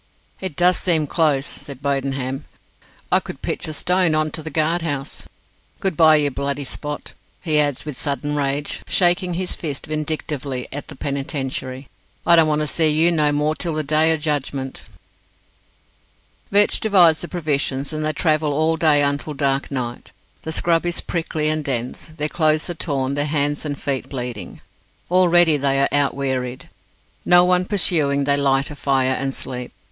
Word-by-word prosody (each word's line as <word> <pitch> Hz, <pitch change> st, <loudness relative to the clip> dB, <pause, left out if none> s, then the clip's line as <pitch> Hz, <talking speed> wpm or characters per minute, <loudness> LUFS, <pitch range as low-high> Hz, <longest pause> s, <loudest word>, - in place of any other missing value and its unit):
"It 185 Hz, -6 st, -5 dB
does 180 Hz, +2 st, +4 dB
seem 165 Hz, -5 st, +1 dB
close," 145 Hz, -3 st, +1 dB
said 140 Hz, -2 st, -7 dB
Bodenham; 135 Hz, -1 st, -2 dB, 0.7 s
"I -, -, +5 dB
could -, -, -10 dB
pitch -, -, -2 dB
a 155 Hz, -, -3 dB
stone 180 Hz, -1 st, +2 dB
on 155 Hz, 0 st, +1 dB
to 160 Hz, -, -4 dB
the 160 Hz, -, -5 dB
guard 160 Hz, +2 st, +1 dB
house. 145 Hz, -4 st, -4 dB, 0.5 s
Good 190 Hz, -4 st, -1 dB
bye, 155 Hz, 0 st, +6 dB
you 145 Hz, -2 st, +2 dB
Bloody 140 Hz, +1 st, -3 dB
Spot!" 150 Hz, +2 st, -6 dB, 0.3 s
he 155 Hz, -4 st, +2 dB
adds, 145 Hz, -2 st, 0 dB
with 150 Hz, -4 st, -7 dB
sudden 145 Hz, 0 st, -2 dB
rage, 145 Hz, 0 st, -1 dB
shaking 180 Hz, 0 st, +2 dB
his 185 Hz, +1 st, -2 dB
fist 145 Hz, -5 st, -5 dB
vindictively 150 Hz, -4 st, -3 dB
at 145 Hz, 0 st, -6 dB
the -, -, -9 dB
Penitentiary; 135 Hz, -2 st, -4 dB, 0.4 s
"I 170 Hz, -, +7 dB
don't 165 Hz, -2 st, +5 dB
want 150 Hz, 0 st, +1 dB
to -, -, 0 dB
see 160 Hz, +1 st, +2 dB
you 160 Hz, +3 st, +3 dB
no 150 Hz, -3 st, +2 dB
more 150 Hz, +1 st, +1 dB
till 165 Hz, 0 st, -3 dB
the 155 Hz, -, -1 dB
Day 155 Hz, +2 st, +3 dB
o' 160 Hz, -, +1 dB
Judgment." 140 Hz, -3 st, -3 dB, 1.6 s
Vetch 205 Hz, +1 st, +4 dB
divides 180 Hz, -7 st, +4 dB
the 175 Hz, -, -5 dB
provisions, 145 Hz, -4 st, -1 dB
and 155 Hz, 0 st, -3 dB
they 155 Hz, -, 0 dB
travel 155 Hz, -1 st, +1 dB
all 160 Hz, +2 st, +1 dB
that 160 Hz, -1 st, +4 dB
day 145 Hz, -1 st, +4 dB
until 145 Hz, +1 st, -1 dB
dark 140 Hz, -1 st, 0 dB
night. 125 Hz, -3 st, -5 dB, 0.3 s
The 160 Hz, -, -5 dB
scrub 165 Hz, +1 st, +1 dB
is 175 Hz, 0 st, -1 dB
prickly 160 Hz, -2 st, -2 dB
and 155 Hz, 0 st, 0 dB
dense. 125 Hz, +2 st, -4 dB
Their 150 Hz, -, 0 dB
clothes 155 Hz, -1 st, +1 dB
are -, -, -3 dB
torn, 140 Hz, -5 st, -2 dB
their 145 Hz, +1 st, 0 dB
hands 145 Hz, 0 st, 0 dB
and 145 Hz, -2 st, -4 dB
feet 135 Hz, -2 st, -3 dB
bleeding. 120 Hz, -8 st, -6 dB, 0.5 s
Already 175 Hz, -3 st, +5 dB
they 140 Hz, -1 st, +1 dB, 0.2 s
feel 145 Hz, -, +3 dB
out 140 Hz, -, +1 dB
wearied. 130 Hz, -2 st, -3 dB, 0.5 s
No 175 Hz, 0 st, +6 dB
one 180 Hz, 0 st, +2 dB
pursuing, 155 Hz, -8 st, +2 dB
they 140 Hz, 0 st, +3 dB
light 140 Hz, 0 st, +1 dB
a -, -, -7 dB
fire, 135 Hz, -2 st, +1 dB
and 135 Hz, 0 st, -2 dB
sleep. 125 Hz, -2 st, -4 dB
150 Hz, 175 wpm, -21 LUFS, 140-160 Hz, 1.6 s, I